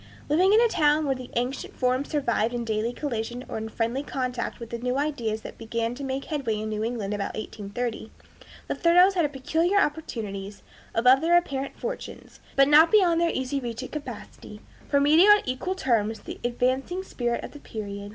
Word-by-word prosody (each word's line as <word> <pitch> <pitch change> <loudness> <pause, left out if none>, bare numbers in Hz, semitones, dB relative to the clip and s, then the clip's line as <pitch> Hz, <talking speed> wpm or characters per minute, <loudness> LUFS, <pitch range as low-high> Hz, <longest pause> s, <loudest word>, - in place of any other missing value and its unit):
Living 360 +6 +4
in 430 - +6
a 475 - +5
town 305 -6 +2
where 275 - +2
the 255 -1 -8
ancient 250 +3 -2
forms 255 +2 0
survived 240 -5 0
in 235 -1 -3
daily 220 +1 -1
collision 245 -2 -4
or - - -4
in 220 0 -5
friendly 230 +4 -1
contact 255 -4 -3
with 235 -1 -9
the 235 - -4
new 250 +2 -1
ideas 240 -7 -1
that - - -10
began 230 +1 -2
to 275 +3 -7
make 270 0 -3
headway 260 -8 -2
in 215 0 -4
New 215 0 -2
England 220 -3 -2
about 205 -1 -3
1830, 220 +2 -5 0.6
the - - -1
Thoreaus 355 +3 +5
had 330 -6 +1
peculiar 320 +8 0
opportunities, 210 - -3 0.3
above 250 +4 +5
their 340 +2 +5
apparent 275 -5 -2
fortunes, - - -7 0.2
but 275 0 +6
not 305 +3 +7
beyond 355 -6 +4
their 340 - +3
easy 260 -1 -2
reach 235 -3 -5
of - - -8
capacity, 245 -6 -8 0.3
for 280 - +3
meeting 310 +7 +6
on 415 0 +7
equal 260 +9 -2
terms 225 - 0
the - - -8
advancing 260 +9 -1
spirit 240 -9 -2
of - - -7
the 295 - -11
period. 200 -4 -7
255 Hz, 190 wpm, -26 LUFS, 230-300 Hz, 0.6 s, not